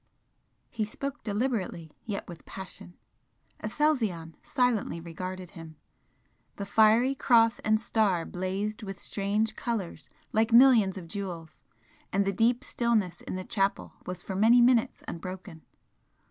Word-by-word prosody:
He 220 - -2
spoke 275 +6 -5
deliberately, 205 - -2
yet 205 -3 -4
with 175 -3 -10
passion. 190 -2 -10 0.7
Aselzion 215 - 0
silently 245 -9 0
regarded 180 +2 -7
him. 160 -1 -11 0.8
The 200 - -5
fiery 220 +5 +4
Cross 230 -4 +4
and 215 0 +2
Star 205 -7 +1
blazed 195 +4 -3
with 195 -2 -7
strange 210 +2 -1
colours 225 -7 -4 0.2
like 220 +2 +2
millions 230 -6 +6
of 175 -3 -8
jewels, 175 -4 -6 0.5
and 200 +1 +2
the 195 - 0
deep 235 +5 +2
stillness 220 -10 0
in - - -6
the 185 - -4
chapel 195 -1 -1
was 180 -1 -6
for 190 - -5
many 225 +5 +6
minutes 240 -1 +3
unbroken. 185 -1 -7
205 Hz, 130 wpm, -28 LUFS, 185-230 Hz, 0.8 s, millions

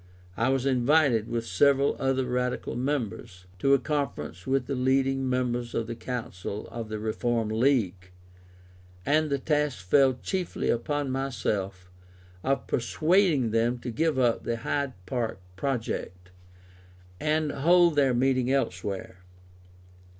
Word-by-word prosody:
I 115 +6 +1
was 135 -1 +1
invited, 130 -3 +3
with 115 -1 -2
several 140 +8 +3
other 135 -1 +1
Radical 125 -1 -2
members, 115 -8 -3
to 135 +5 +4
a - - +4
conference 125 - -3
with 135 -1 +1
the 140 - -3
leading 135 0 +1
members 120 -2 -1
of 115 - 0
the 115 - -5
Council 110 -5 -5
of 115 -2 -6
the 110 - -3
Reform 110 +1 -1
League; 110 -6 +1 1.0
and 155 +1 +2
the 140 - +1
task 145 - -1
fell 135 +4 +5
chiefly 185 -3 -2
upon 145 +3 -1
myself, 105 -8 -3 0.5
of 135 +1 0
persuading 155 - +2
them 115 +2 +1
to 120 0 -6
give 155 +5 0
up 120 -3 +2
the 115 - -2
Hyde 140 +3 -2
Park 115 +1 -2 0.2
project, 95 -6 -3 0.9
and 155 0 0
hold 170 +3 +4
their 135 -4 +3
meeting 130 0 +2
elsewhere. 95 -7 -2
125 Hz, 130 wpm, -27 LUFS, 115-140 Hz, 1.0 s, fell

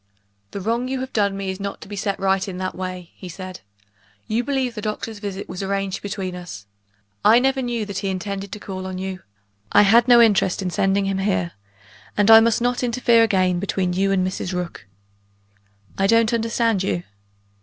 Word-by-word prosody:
"The - - -6
wrong 230 +5 -1
you 265 0 -2
have 260 0 -6
done 200 -2 +1
me 195 -1 -3
is 190 - -7
not 200 0 -5
to - - -10
be 205 - -7
set 200 0 -2
right 195 0 +1
in 185 -2 -5
that 185 0 -3
way," 185 -2 -6
he 185 - -10
said. 185 +1 -8 0.7
"You 230 +3 0
believe 265 -2 -1
the 215 - -6
doctor's 215 +1 -4
visit 200 -1 -5
was 180 - -6
arranged 195 -1 -2
between 190 -2 -4
us. 175 - -9 0.6
I 225 - +7
never 265 +2 +2
knew 240 -3 -2
that 200 -2 -4
he 195 - -3
intended 195 +1 -4
to 210 - -6
call 185 -2 -6
on 185 -1 -5
you; 190 0 -5 0.5
I - - +6
had 230 +4 +5
no 240 -1 +7
interest 205 -4 +3
in 180 - -2
sending 195 +2 +1
him 195 0 -1
here 190 -3 0 0.7
and 205 +1 +5
I 225 - +11
must 230 +1 +2
not 245 0 0
interfere 240 -1 +3
again 185 -5 +2
between 185 -1 -1
you 195 +2 +1
and 185 -1 +2
Mrs. 185 0 -3
Rook." 180 - -5 1.1
"I 195 - +3
don't 230 +2 +3
understand 230 -2 +1
you." 175 -2 -1
195 Hz, 200 wpm, -22 LUFS, 185-225 Hz, 1.1 s, I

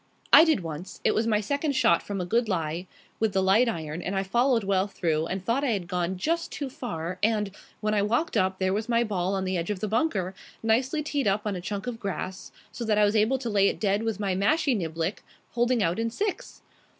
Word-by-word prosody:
"I - - +11
did 315 - +2
once. 165 +2 -7
It 215 - +3
was 220 +1 +1
my 215 -2 +2
second 285 +6 -1
shot, 250 -4 +4
from 200 -1 -5
a 180 - -2
good 230 +5 +1
lie, 165 -1 -2 0.3
with 220 -2 +1
the 190 0 +2
light 215 +6 +4
iron, 160 -4 -4
and 190 +3 -3
I 195 - +1
followed 240 +3 +2
well 195 0 +1
through 165 -5 -1
and 190 +1 -4
thought 250 +5 +1
I 255 -5 +2
had 185 -4 -3
gone 180 +1 -1
just 330 - -1
too 280 -3 -4
far, 180 -8 -5
and, 210 -2 +1 0.3
when 215 0 0
I 205 - +2
walked 235 +10 0
up, 190 -2 +1
there 190 0 +1
was 215 +3 -2
my 235 0 +3
ball 195 -3 -1
on 190 -1 -1
the 185 0 -1
edge 170 +2 -3
of 205 -3 -2
the 215 - -2
bunker, 210 - 0 0.3
nicely 255 +7 +1
teed 285 -5 -1
up 200 +2 +1
on 205 -2 -1
a 180 - -5
chunk 200 +3 -4
of 245 -2 -4
grass, 190 -2 -5 0.2
so 240 - -6
that 215 -2 +1
I 210 - +5
was 205 +2 +1
able 220 +5 +3
to 245 -3 -4
lay 200 -1 +4
it - - -1
dead 200 0 +1
with 225 -3 -2
my 200 -2 0
mashie 260 - +2
niblick, 165 0 -2 0.3
holing 240 -2 +2
out 170 +4 0
in 230 0 0
six. 415 - -4
210 Hz, 245 wpm, -27 LUFS, 185-235 Hz, 0.3 s, I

